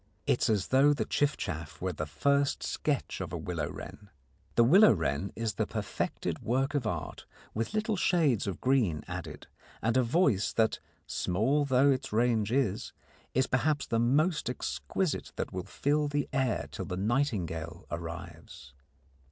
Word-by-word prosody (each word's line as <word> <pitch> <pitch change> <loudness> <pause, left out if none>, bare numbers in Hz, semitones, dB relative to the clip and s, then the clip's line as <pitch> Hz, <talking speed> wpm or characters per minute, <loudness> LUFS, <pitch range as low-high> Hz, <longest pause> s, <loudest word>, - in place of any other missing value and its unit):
It - - +2
is - - +2
as 105 -4 +1
though 140 +3 +5
the 145 - -1
chiffchaff 85 - -2
were 95 0 -2
the 75 -1 -4
first 140 - +1
sketch - - -2
of - - -5
a - - -3
willow - - -3
wren. 105 -1 -9 0.5
The 120 - +6
willow 185 - +7
wren 80 0 -1
is 115 -1 -2
the - - -1
perfected - - -3
work 135 +4 0
of 135 -6 0
art, 85 -8 -4 0.3
with 115 - -3
little 215 0 +1
shades 160 - +2
of 95 - -3
green 115 - +2
added - - -6 0.3
and 115 +3 0
a 130 - +5
voice 120 - +2
that, 110 -1 +2 0.3
small 130 +11 +1
though 135 +1 +4
its 130 0 -2
range 110 -1 +2
is, 120 -6 0 0.4
is 130 +1 +4
perhaps 145 +3 +1
the 115 - 0
most 150 +5 +2
exquisite 160 +6 -2
that - - -4
will 90 -1 -4
fill 150 +1 +1
the 145 -1 -1
air 125 - 0
till - - -5
the 90 - -4
nightingale 95 - -1
arrives. 85 -3 -7
120 Hz, 160 wpm, -30 LUFS, 90-140 Hz, 0.5 s, willow